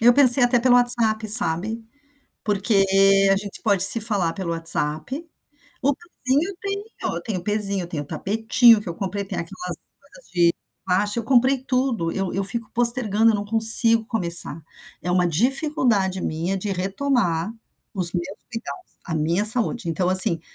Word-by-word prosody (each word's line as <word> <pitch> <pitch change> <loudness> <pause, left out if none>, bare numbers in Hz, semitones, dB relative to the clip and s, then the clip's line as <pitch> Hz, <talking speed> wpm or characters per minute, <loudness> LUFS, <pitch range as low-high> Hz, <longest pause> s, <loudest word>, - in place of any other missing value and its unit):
Eu 240 +2 +4
pensei 255 -1 +8
até 245 0 +2
pelo 245 +1 +1
WhatsApp, 235 -3 +2
sabe? 215 +2 +3 0.6
Porque 205 -1 0 0.5
a - - +2
gente 200 0 -8
pode 200 -4 0
se 195 +4 +4
falar 200 -7 +3
pelo 185 -3 -6
WhatsApp. 165 - -1 0.6
O 280 +2 +1
pezinho 300 -2 -4
eu 390 - -13
tenho, 400 +2 -7
tenho 205 -6 -6
o - - -17
pezinho, 205 -2 -1
eu - - -8
tenho 155 -4 -6
o - - -21
tapetinho 225 - +1
que 210 - -10
eu 170 - -7
comprei, 200 +2 -6
tem 195 - -8
aquelas 180 0 -8 0.2
coisas 325 - -22
de 170 -2 +1 0.3
elástico, 205 +5 -2
eu - - -11
comprei 260 +2 +1
tudo, 250 -10 -3
eu 195 -2 -5
eu 195 +1 -4
fico 230 +2 -5
postergando, 230 -2 +4
eu - - -4
não 205 0 -4
consigo 225 +1 +4
começar. 170 -7 +1 0.4
É 180 - -6
uma 180 0 0
dificuldade 230 - -1
minha 170 +5 -4
de 200 +2 -6
retomar 195 -1 -3 0.4
os 180 -4 +2
meus 185 +3 -7
cuidados, 240 +10 -10
a 170 - -6
minha 165 +6 -2
saúde. 225 -3 -2
Então 180 +2 -3
assim, 185 -3 +6
210 Hz, 170 wpm, -20 LUFS, 180-240 Hz, 0.6 s, pensei